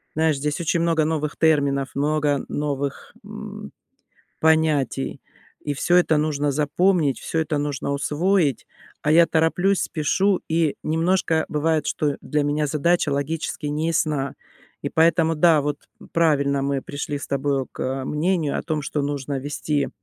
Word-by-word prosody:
Знаешь, 160 -1 +2
здесь 145 +1 -2
очень 170 0 0
много 165 -2 +2
новых 155 -1 -2
терминов, 140 -4 +2
много 145 -1 +1
новых, 145 -1 -3
мм, - - -8 0.7
понятий. 155 -4 +1 0.4
И 145 - -2
всё 175 +6 +2
это 175 -3 +4
нужно 150 -1 0
запомнить, 150 +1 +1
всё 165 - -3
это 155 -1 -1
нужно 145 -1 -2
усвоить, 150 - +1 0.4
а 150 - +2
я 170 +1 +6
тороплюсь, 175 +5 +2
спешу, 190 +5 +1
и 160 -2 +1
немножко 165 0 +1
бывает, 155 +1 0
что 145 -2 -1
для 150 -1 -1
меня 145 +1 0
задача 155 +3 +1
логически 150 +2 -3
неясна, 150 -2 -1 0.5
и - - -1
поэтому 165 0 +3
да, 160 -1 +5
вот 145 0 -2 0.3
правильно, 140 -4 +2
мы 140 -1 -1
пришли 145 0 -4
с - - -7
тобою 140 -1 0
к, - - -10
э-э, 130 +1 -2
мнению 155 +1 0
о - - -3
том, 155 -2 -2
что 145 0 -2
нужно 140 -1 -3
вести 145 +1 -2
150 Hz, 145 wpm, -23 LUFS, 140-160 Hz, 0.7 s, я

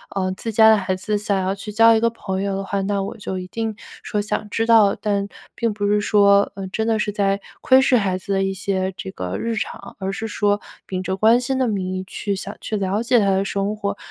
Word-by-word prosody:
嗯， 185 -1 0
自 225 - -5
家 220 +1 +7
的 220 - +6
孩 185 -1 -1
子 210 +3 -2
想 205 -1 -1
要 190 +1 0
去 210 +1 -8
交 225 +2 +6
一 220 - +3
个 230 +1 +2
朋 190 -4 -4
友 200 -1 -1
的 195 - -3
话， 195 0 -2
那 200 0 -1
我 - - -6
就 190 -2 -5
一 180 - -7
定 225 +2 -3 0.3
说 210 -2 -1
想 210 0 -3
知 225 +2 0
道， 220 -4 +5
但 200 -2 -1 0.3
并 230 -2 -1
不 205 -1 -2
是 210 0 +3
说， 200 -1 +4
嗯， 195 -1 -6
真 220 - -1
的 220 -1 +1
是 210 - -1
在 200 -1 0 0.2
窥 260 0 +6
视 260 -1 +4
孩 190 -4 0
子 195 +2 -7
的 195 0 +1
一 195 0 -1
些 190 -1 -2
这 95 - -6
个 90 0 -4
日 230 -1 -2
常， 220 - -5
而 190 0 -2
是 220 +2 -4
说 205 -1 0 0.2
秉 185 -1 -3
着 190 +1 -2
关 225 +4 +5
心 260 +2 -1
的 260 -1 +1
名 190 -4 -2
义 185 - -3
去 200 +1 -3
想 195 +2 -6
去 215 - -3
了 195 +2 -1
解 240 0 +4
他 200 - +2
的 190 +1 +2
生 200 +1 -1
活， 200 -1 -3
200 Hz, 275 characters per minute, -21 LUFS, 195-220 Hz, 0.3 s, 家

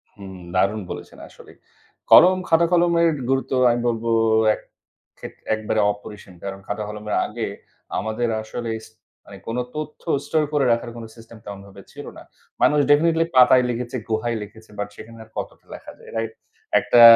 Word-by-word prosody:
হুম, 95 -2 -10 0.2
দারুণ 100 +3 +2
বলেছেন, - - -8
আসলেই। - - -16 0.5
কলম, 185 +1 +8
খাতা-কলমের 170 0 +4 0.2
গুরুত্ব 135 -1 0 0.2
আমি 120 0 +1
বলব 115 -1 -1 0.5
এক - - -8 0.6
ক্ষে - - -7 0.3
একেবারে 110 0 0
অপরিসীম। 105 -2 -12
কারণ 95 0 -5
খাতা-কলমের 105 0 -4
আগে 115 +1 -4 0.5
আমাদের 110 +4 -2
আসলে 115 +1 -5
ইস - - -14 0.4
মানে - - -11
কোন 115 +2 -3 0.2
তথ্য 155 0 -6 0.2
store 155 -1 +1
করে 140 -3 +2
রাখার 120 0 -3
কোনো 115 -1 -8
system 115 0 -14
তেমনভাবে 100 -1 -10
ছিল - - -9
না। - - -11 0.4
মানুষ 150 0 +4
definitely 165 +2 +4
পাতায় 125 0 +7
লিখেছে, 120 +1 -3
গুহায় 110 +1 -1
লিখেছে, 110 +2 -14
বাট 105 - -2
সেখানে 115 +1 -12
আর 110 - -20
কতটা - - -6
লেখা - - -10
যায়, - - -14
right? 115 0 -2 0.5
একটা 120 - +4
115 Hz, 155 wpm, -22 LUFS, 105-135 Hz, 0.6 s, কলম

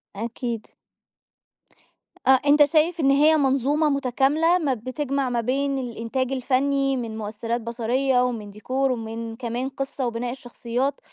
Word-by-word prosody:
أكيد. 230 +1 -4 1.6
أ - - +4
أنت 285 +3 +5
شايف 320 +3 +2
إن 275 -2 +4
هي 305 +3 +5
منظومة 280 +2 +2
متكاملة 280 +5 +2
ما 290 -6 0
بتجمع 260 +3 -2
ما 240 -1 0
بين 275 +3 0
الإنتاج 245 +2 -3
الفني 270 +1 +1
من 225 -2 -4
مؤثرات 225 +2 -3
بصرية 245 +3 +1
ومن 220 -5 -3
ديكور 260 +6 -1
ومن 225 -1 -5
كمان 245 +2 -3
قصّة 270 -1 -3
وبناء 240 +1 -3
الشخصيات، 250 +2 -3
260 Hz, 130 wpm, -24 LUFS, 235-275 Hz, 1.6 s, أنت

